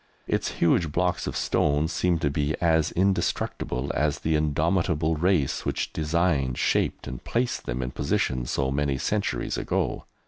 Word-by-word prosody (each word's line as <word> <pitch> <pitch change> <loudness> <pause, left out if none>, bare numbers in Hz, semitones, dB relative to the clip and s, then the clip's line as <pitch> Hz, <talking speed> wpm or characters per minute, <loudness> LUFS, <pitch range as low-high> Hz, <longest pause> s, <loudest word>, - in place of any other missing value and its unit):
Its - - -1
huge 85 -1 +2
blocks 90 +3 0
of - - -3
stone 75 +1 +1
seem 90 +1 +1
to 75 -3 0
be 75 +1 0
as 80 -2 +2
indestructible 90 -8 0
as 75 +1 +1
the 80 - -1
indomitable 80 +1 +1
race 85 -4 +1
which - - -2
designed, 75 -5 +1
shaped, - - 0
and - - -7
placed 120 +1 -1
them 65 +2 -2
in 60 - -4
position 65 -1 0
so 65 +1 0
many 70 -1 0
centuries 100 +8 -1
ago. - - -1
75 Hz, 150 wpm, -26 LUFS, 70-85 Hz, -, huge